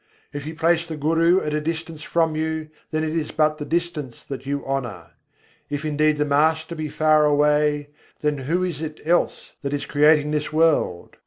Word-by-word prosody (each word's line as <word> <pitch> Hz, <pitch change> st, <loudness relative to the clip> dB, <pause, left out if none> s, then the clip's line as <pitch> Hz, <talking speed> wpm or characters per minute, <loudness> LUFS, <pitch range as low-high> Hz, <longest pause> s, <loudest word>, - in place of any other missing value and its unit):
If 145 Hz, 0 st, -5 dB
you 160 Hz, -, -6 dB
place 165 Hz, +1 st, +2 dB
the 160 Hz, -2 st, -5 dB
Guru 165 Hz, +5 st, +3 dB
at 150 Hz, -, -3 dB
a 150 Hz, -, 0 dB
distance 160 Hz, 0 st, -4 dB
from 165 Hz, -1 st, +1 dB
you, 160 Hz, 0 st, -2 dB, 0.2 s
then 155 Hz, 0 st, -1 dB
it 160 Hz, 0 st, -2 dB
is 160 Hz, -2 st, -1 dB
but 155 Hz, 0 st, +1 dB
the 150 Hz, -, -4 dB
distance 160 Hz, -6 st, -3 dB
that 135 Hz, 0 st, -7 dB
you 140 Hz, 0 st, -2 dB
honour: 120 Hz, -12 st, -4 dB, 0.6 s
If 145 Hz, +1 st, -3 dB
indeed 155 Hz, 0 st, +2 dB
the 150 Hz, -, +1 dB
Master 160 Hz, +3 st, +2 dB
be 155 Hz, -2 st, -4 dB
far 155 Hz, +1 st, +3 dB
away, 150 Hz, 0 st, +2 dB, 0.3 s
then 150 Hz, -1 st, 0 dB
who 165 Hz, +8 st, 0 dB
is 170 Hz, -5 st, -3 dB
it 155 Hz, -1 st, -5 dB
else 175 Hz, +2 st, 0 dB
that 140 Hz, -1 st, -3 dB
is 145 Hz, -, -2 dB
creating 150 Hz, 0 st, +4 dB
this 150 Hz, 0 st, -1 dB
world? 155 Hz, -, +1 dB
155 Hz, 190 wpm, -23 LUFS, 145-160 Hz, 0.6 s, creating